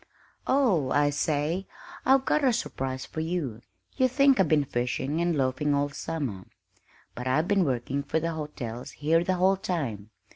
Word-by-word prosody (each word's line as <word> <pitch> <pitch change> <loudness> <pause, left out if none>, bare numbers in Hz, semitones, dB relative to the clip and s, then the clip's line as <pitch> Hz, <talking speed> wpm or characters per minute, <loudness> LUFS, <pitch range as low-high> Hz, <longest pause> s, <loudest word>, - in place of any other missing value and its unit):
Oh, 215 - +3
I 145 +1 +3
say, 150 +5 -1 0.4
I've 265 0 +5
got 305 - +2
a 260 - +5
surprise 130 - -3
for - - -7
you. 160 -9 -3 0.4
You 260 -1 +4
think 275 -1 +4
I've 190 - +4
been 150 -1 +3
fishing 130 +4 -2
and 170 -2 +1
loafing 140 +2 +1
all 145 0 +1
summer, 140 - -4 0.7
but 125 +1 -6
I've 155 +6 +2
been 195 -3 +3
working 130 +1 -1
for 140 +3 -1
the 165 +1 -2
hotels 130 -7 -6
here 165 +3 +2
the 185 +1 0
whole 190 +2 +3
time. 130 - -3
150 Hz, 170 wpm, -27 LUFS, 130-180 Hz, 0.7 s, I've